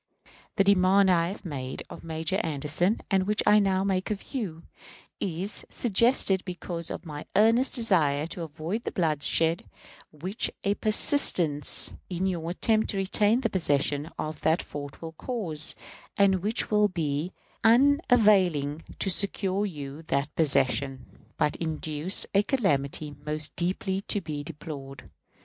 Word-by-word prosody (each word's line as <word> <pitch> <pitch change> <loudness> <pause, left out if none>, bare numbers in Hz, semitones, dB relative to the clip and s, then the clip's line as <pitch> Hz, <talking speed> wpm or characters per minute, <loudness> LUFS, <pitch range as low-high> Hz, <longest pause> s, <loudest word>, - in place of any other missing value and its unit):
The 195 - +3
demand 195 0 +4
I 170 -1 +2
have 195 +2 -8
made 135 -5 -5
of - - -11
Major 160 +3 -2
Anderson, 160 +4 -1
and 190 -1 +2
which 210 0 +1
I 210 - +6
now 190 -2 +1
make 190 -1 -1
of 210 -2 -6
you, 180 -11 -4 0.6
is 190 +2 -4
suggested 225 -3 +2
because 175 -2 -5
of - - -7
my 150 -2 -8
earnest 230 +6 +4
desire 160 - +2
to 170 +1 -6
avoid 165 +8 -5
the - - -4
bloodshed 165 0 0 0.4
which 180 +8 -3
a 200 - +2
persistence 180 - +3 0.2
in 180 0 -2
your 170 -3 -2
attempt 220 +5 +1
to 200 - -2
retain 205 +5 +2
the 230 - 0
possession 145 -3 0
of 155 0 -5
that 160 +2 +1
fort 145 +1 -9
will 165 - -6
cause, 165 - -2 0.4
and 195 -2 +3
which 215 +4 -1
will 210 0 +4
be 160 -2 -3 0.3
unavailing 215 - +3
to 195 - +1
secure 200 +1 +1
you 145 -4 -8
that 140 +1 -1
possession, 135 -3 -1
but 150 - +1
induce 160 +2 +1
a 200 - +5
calamity 150 - -1
most 150 0 -4
deeply 190 +2 -1
to 205 - +1
be 150 -6 -5
deplored. 140 -3 -9
175 Hz, 140 wpm, -27 LUFS, 150-200 Hz, 0.6 s, I